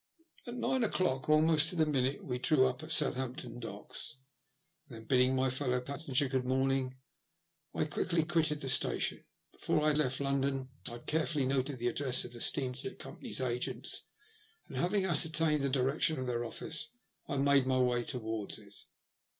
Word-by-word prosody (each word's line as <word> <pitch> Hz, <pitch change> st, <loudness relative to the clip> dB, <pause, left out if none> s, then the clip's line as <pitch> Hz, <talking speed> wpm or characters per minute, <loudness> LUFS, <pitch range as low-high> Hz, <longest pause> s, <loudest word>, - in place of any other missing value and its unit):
At 240 Hz, -, -5 dB
nine 255 Hz, 0 st, 0 dB
o'clock 155 Hz, -, 0 dB
almost 155 Hz, 0 st, +5 dB
to 180 Hz, -, -3 dB
the 160 Hz, -2 st, +3 dB
minute 135 Hz, -2 st, 0 dB
we 125 Hz, -1 st, -3 dB
drew 135 Hz, -1 st, +3 dB
up 130 Hz, +1 st, -1 dB
at 155 Hz, +1 st, -8 dB
Southampton 125 Hz, -4 st, +2 dB
Docks, 120 Hz, +1 st, -5 dB, 0.7 s
and 130 Hz, -, -11 dB
then, 110 Hz, -, -10 dB
bidding 125 Hz, +2 st, +3 dB
my 130 Hz, 0 st, +2 dB
fellow 125 Hz, -1 st, 0 dB
passenger 140 Hz, +1 st, -1 dB
good 130 Hz, -1 st, -1 dB
morning, 130 Hz, 0 st, 0 dB, 0.8 s
I -, -, +1 dB
quickly 165 Hz, +2 st, 0 dB
quitted 160 Hz, -2 st, 0 dB
the 135 Hz, -, -3 dB
station. -, -, +2 dB, 0.3 s
Before 150 Hz, -, -1 dB
I 155 Hz, -, +4 dB
left 135 Hz, -3 st, 0 dB
London 135 Hz, -1 st, -1 dB, 0.2 s
I 120 Hz, -, -4 dB
had 120 Hz, -, -10 dB
carefully 155 Hz, -3 st, 0 dB
noted 135 Hz, +1 st, 0 dB
the 120 Hz, 0 st, -2 dB
address 130 Hz, 0 st, +1 dB
of 120 Hz, -, -9 dB
the 120 Hz, -, -8 dB
steamship 130 Hz, -2 st, 0 dB
company's -, -, -5 dB
agents, 125 Hz, -1 st, -2 dB, 0.6 s
and, -, -, -10 dB
having 190 Hz, +2 st, +1 dB
ascertained 160 Hz, -2 st, +3 dB
the 140 Hz, -, 0 dB
direction 135 Hz, +4 st, +1 dB
of 130 Hz, -, -3 dB
their 120 Hz, -1 st, -2 dB
office, 155 Hz, +6 st, -5 dB, 0.4 s
I 140 Hz, -, -2 dB
made 140 Hz, -1 st, +3 dB
my 130 Hz, 0 st, +2 dB
way 125 Hz, -1 st, +2 dB
towards 110 Hz, -4 st, -4 dB
it. 100 Hz, -2 st, -17 dB
135 Hz, 170 wpm, -32 LUFS, 125-155 Hz, 0.8 s, almost